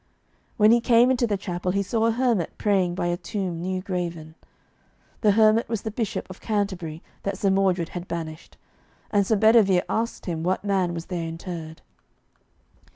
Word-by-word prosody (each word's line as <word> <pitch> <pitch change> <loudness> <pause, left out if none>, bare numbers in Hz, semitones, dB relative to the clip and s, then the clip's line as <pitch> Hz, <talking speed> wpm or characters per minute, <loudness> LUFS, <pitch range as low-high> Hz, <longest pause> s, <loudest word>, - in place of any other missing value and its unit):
When 215 0 +6
he 235 0 +5
came 235 +2 +5
into 245 -2 +1
the 205 -2 0
chapel 180 -1 -3
he 200 0 +1
saw 225 +4 +1
a - - +3
hermit 230 -7 0
praying 190 -4 +1
by 175 - -2
a 175 0 0
tomb 180 -2 -4
new 185 +1 -3
graven. 170 -4 -4 0.9
The 210 -3 +4
hermit 220 +2 +4
was 225 -3 -2
the 220 - -3
Bishop 220 -1 -3
of 185 - -11
Canterbury 190 -7 -2 0.2
that 200 -1 -3
Sir 195 0 +1
Mordred 185 -3 +1
had 175 0 -7
banished, 160 -1 -6 0.5
and 200 -2 +2
Sir 220 - +3
Bedivere 205 -4 +5
asked 230 +1 -2
him 165 -3 -3
what 185 +4 -1
man 190 -4 +1
was 165 0 -5
there 170 -3 -4
interred. 165 -1 -7
190 Hz, 175 wpm, -24 LUFS, 175-215 Hz, 0.9 s, When